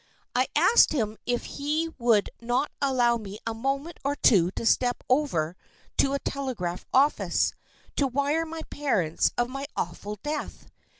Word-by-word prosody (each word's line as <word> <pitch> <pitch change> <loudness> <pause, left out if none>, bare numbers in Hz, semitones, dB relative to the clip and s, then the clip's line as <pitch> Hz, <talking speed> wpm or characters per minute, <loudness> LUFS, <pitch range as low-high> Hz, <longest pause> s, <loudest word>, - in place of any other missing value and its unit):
I - - +2
asked 470 - +6
him 220 -7 -1
if 245 -1 0
he 305 +3 -2
would 230 -4 +3
not 245 +5 0
allow 245 -4 +3
me 205 -2 -8
a 225 - -1
moment 275 +8 -3
or 280 +1 0
two 185 -11 +4
to - - -3
step 245 +1 +2
over 240 - +1 0.4
to 275 - +3
a 280 - 0
telegraph 230 -13 -4
office 280 +3 +2 0.4
to 280 - +3
wire 285 +5 0
my 320 0 -6
parents 200 - 0
of 240 - +2
my 275 +2 -5
awful 205 +4 -3
death. 300 0 -4
255 Hz, 155 wpm, -27 LUFS, 225-285 Hz, 0.4 s, asked